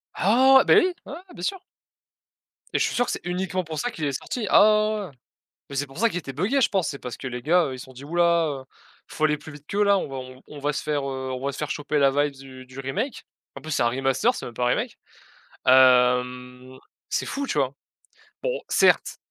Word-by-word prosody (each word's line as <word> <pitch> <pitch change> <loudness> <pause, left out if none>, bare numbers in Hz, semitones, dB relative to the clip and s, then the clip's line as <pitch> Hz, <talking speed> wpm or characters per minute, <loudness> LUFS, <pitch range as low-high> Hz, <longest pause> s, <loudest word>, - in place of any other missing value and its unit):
Ah! 260 +6 +5
Beh - - +7
oui, 370 -3 +4
ouais, - - -8
ouais, 355 +3 -11
bien - - -10
sûr! 385 -2 -3 1.1
Et - - +2
je - - +3
suis - - -3
sûr 245 - +2
que - - -3
c'est - - -5
uniquement 185 +1 -2
pour 160 -2 -7
ça 245 - -2
qu'il 160 - -7
est 140 - -1
sorti. 225 -5 -4
Ah - - +7
ouais, 215 0 +4
ouais, 215 - -1
ouais, 200 - -5
ouais. 155 - -14 0.6
Mais 140 - -7
c'est 145 +1 0
pour 135 - -11
ça 230 0 +3
qu'il 180 - -4
était 135 -6 -6
buggé 200 - 0
je - - +3
pense. 190 -5 0
C'est 140 - -5
parce 125 -2 -7
que 130 - -6
les 125 -1 -5
gars, 175 +3 +3
heu, 135 - -4
ils 130 - -10
se - - -9
sont 130 - -15
dit: 130 +3 -11
«Ouh 165 - -7
là, 170 -5 +2 0.5
il - - -10
faut 155 - +2
aller 150 -1 +1
plus 155 - -11
vite 145 0 -14
qu'eux 205 +1 +1
là, 200 -1 +4
on - - -4
va 135 - -8
on 130 0 -9
on 150 - -10
va 145 +1 -1
se - - -3
faire, 150 -1 -1
heu, 130 -1 -4
on 130 +1 -5
va 140 - 0
se 140 - -9
faire 150 - -3
choper 150 0 -1
la 140 -1 +5
vibes 145 0 0
du 130 -1 -12
du 130 +1 -11
remake». 205 - -4 0.3
En - - -9
plus, 155 - -7
c'est 140 - +1
un 120 - +3
remaster, 135 - +1
c'est - - -7
même 120 - -9
pas 125 - -1
remake, 125 - -1 0.7
hem, 125 0 +3 0.3
c'est - - -1
fou, 280 0 -3
tu 150 - -2
vois? 135 -1 0 0.7
Bon, - - -1
certes - - +3
145 Hz, 265 wpm, -24 LUFS, 130-200 Hz, 1.1 s, Beh